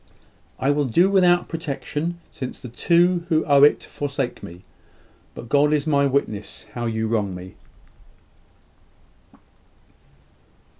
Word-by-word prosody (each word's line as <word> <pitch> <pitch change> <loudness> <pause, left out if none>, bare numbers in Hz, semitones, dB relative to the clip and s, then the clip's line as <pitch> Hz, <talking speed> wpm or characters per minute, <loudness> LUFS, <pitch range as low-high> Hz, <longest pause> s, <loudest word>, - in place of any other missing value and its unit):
I 135 - +1
will 145 0 +1
do 175 - +3
without 180 -2 +4
protection, 165 +1 -4
since 130 -2 -7
the 125 - -9
two 175 +7 +2
who 160 -2 +2
owe 140 -1 +4
it 145 - +5
forsake 140 -3 -4
me: 85 +2 -11 0.7
but - - -9
God 145 +4 +3
is 150 -1 +1
my 140 -2 +2
witness 110 -7 -3
how 120 0 -3
you 110 0 -2
wrong 105 -4 -1
me." 90 +1 -10
140 Hz, 120 wpm, -22 LUFS, 115-165 Hz, 0.7 s, it